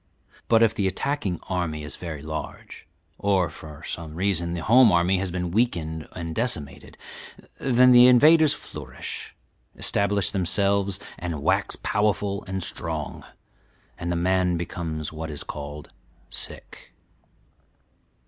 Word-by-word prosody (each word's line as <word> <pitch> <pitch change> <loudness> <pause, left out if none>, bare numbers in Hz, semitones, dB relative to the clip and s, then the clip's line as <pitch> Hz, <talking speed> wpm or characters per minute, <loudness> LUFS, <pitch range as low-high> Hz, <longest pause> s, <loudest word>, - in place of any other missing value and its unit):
But 115 -1 +5
if 110 - +4
the 100 - 0
attacking 100 -1 -2
army 85 -5 -2
is 75 0 -5
very 80 -5 -7
large, 80 0 -7 0.3
or 95 -4 +2
from 75 -1 -11
some 80 -2 -6
reason 85 -2 0
the 85 - -4
home 120 +2 +6
army 90 +2 +3
has 95 0 -1
been 90 -1 -3
weakened 85 -8 -1
and 85 -2 -5
decimated, 80 - -2 0.6
then 125 -1 +5
the 125 0 +9
invaders 155 +4 +6
flourish, 65 -4 -8 0.4
establish 100 -2 +1
themselves 100 +1 +1 0.2
and 85 -5 -4
wax - - +1
powerful 105 -1 0
and 95 -1 -3
strong, 80 -4 -5 0.7
and 85 +1 -4
the - - 0
man 90 0 +1
becomes 80 -3 -4
what 80 +1 -5
is 75 -2 -3
called 75 0 -7 0.4
'sick.' - - -8
90 Hz, 130 wpm, -25 LUFS, 80-100 Hz, 0.7 s, the